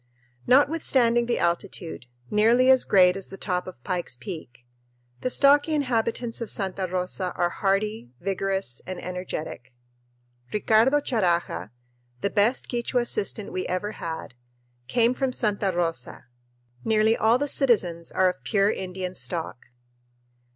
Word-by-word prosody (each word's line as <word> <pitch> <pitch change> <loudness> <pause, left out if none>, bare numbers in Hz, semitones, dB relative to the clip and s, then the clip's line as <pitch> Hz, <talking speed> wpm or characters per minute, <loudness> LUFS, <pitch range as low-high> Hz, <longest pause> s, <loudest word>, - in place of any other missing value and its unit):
Notwithstanding 255 -4 +3
the 240 - +1
altitude 170 -4 -2 0.2
nearly 235 +5 +5
as 260 -1 +4
great 180 -2 +5
as 195 - -5
the 195 - -10
top 180 -2 -2
of 150 -10 -10
Pike's 175 -8 -3
Peak 125 - -9 0.5
the 255 - -1
stocky 290 +4 +4
inhabitants 235 -3 -1
of 230 - -4
Santa 190 -1 -2
Rosa 180 0 -2
are 175 0 +1
hardy, 195 - -1
vigorous, 195 -7 -2
and 185 -1 -5
energetic. 175 -8 -6 0.8
Ricardo 225 +7 +3
Charaja, 175 - 0 0.5
the 200 - 0
best 215 +5 +1
Quichua 240 +1 0
assistant 215 -3 -1
we 185 - -3
ever 185 +3 -2
had, 160 -8 -6 0.5
came 235 - +3
from 265 0 -1
Santa 205 -5 0
Rosa. 165 -7 -2 0.6
Nearly 220 0 +3
all 225 +2 +3
the 290 +3 -1
citizens 195 - +1
are 185 - +3
of 160 -8 -3
pure 200 +9 +2
Indian 185 -1 -5
stock. 165 -8 -5
195 Hz, 130 wpm, -25 LUFS, 180-235 Hz, 0.8 s, nearly